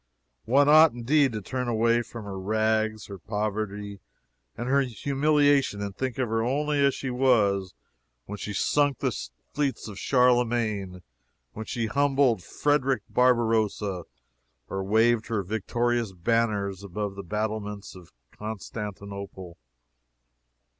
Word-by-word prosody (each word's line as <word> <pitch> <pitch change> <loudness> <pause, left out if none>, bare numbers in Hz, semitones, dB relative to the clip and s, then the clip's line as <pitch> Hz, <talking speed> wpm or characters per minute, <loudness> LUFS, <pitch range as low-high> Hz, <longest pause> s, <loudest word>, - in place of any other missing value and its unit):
One 140 +4 +4
ought, 155 0 +7
indeed, 135 +3 +2
to 105 -2 -4
turn 125 +4 -3
away 115 +1 +2
from 115 -2 -9
her 95 -1 -6
rags, 110 +2 0
her 100 -2 -9
poverty 105 0 -3 0.6
and 120 - -4
her 140 +2 +3
humiliation, 140 0 +2
and 100 -1 -4
think 130 -3 -3
of 130 -2 0
her 115 0 0
only 145 +4 +1
as 140 -1 +3
she 135 - -4
was 105 - +2 0.5
when 105 0 -7
she 105 - -5
sunk 145 +6 +1
the - - -1 0.4
fleets 140 -4 -1
of 100 -3 -8
Charlemagne; 120 -7 +1 0.5
when 110 0 -7
she 115 -2 -2
humbled 135 -2 +2
Frederick 135 +2 0
Barbarossa 110 -6 +1 0.6
or 95 0 -3
waved 110 +3 +2
her 110 -4 -1
victorious 115 +2 -1
banners 100 0 0
above 100 +1 -4
the 100 - -7
battlements 105 +1 -4
of 90 -2 -14 0.2
Constantinople. 100 -3 -7
110 Hz, 125 wpm, -26 LUFS, 100-125 Hz, 0.6 s, ought